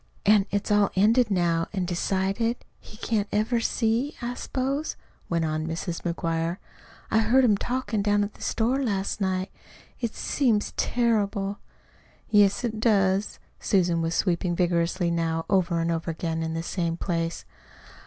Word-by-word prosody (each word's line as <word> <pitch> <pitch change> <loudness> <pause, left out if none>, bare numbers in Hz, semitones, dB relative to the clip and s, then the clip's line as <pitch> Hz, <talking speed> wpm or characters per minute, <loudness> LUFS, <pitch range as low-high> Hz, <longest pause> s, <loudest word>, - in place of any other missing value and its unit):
"An' 205 -1 +5
it's 205 +1 -2
all 205 -1 +4
ended 220 +4 +4
now 170 -3 +1
an' 190 -3 -1
decided 195 +6 -1
he 215 - -14
can't 215 -3 -1
ever 220 +3 +1
see, 230 +4 0
I 240 0 -3
s'pose," 270 +4 -2 0.3
went 170 -1 +1
on 155 0 -2
Mrs. 165 +1 -4
McGuire. 165 0 -2 0.5
"I 220 - +4
heard 240 +4 +4
'em 220 -5 +5
talkin' 240 -1 -2
down 205 0 +2
to 205 - +1
the 205 - -18
store 245 +5 0
last 200 -3 -2
night. 185 0 -1 0.5
It 235 -3 -3
seems 230 -7 0
terrible." 205 -4 0 0.7
"Yes, 205 +1 +4
it 225 -2 -2
does." 200 -3 +2 0.2
Susan 175 -4 +2
was 165 +1 -1
sweeping 175 -1 0
vigorously 170 0 +1
now, 165 -1 -1
over 175 -3 +2
and 165 0 0
over 165 0 -2
again 165 0 -2
in 160 0 -2
the 165 - -2
same 170 -1 -2
place. 165 -2 -2
195 Hz, 155 wpm, -26 LUFS, 170-220 Hz, 0.7 s, An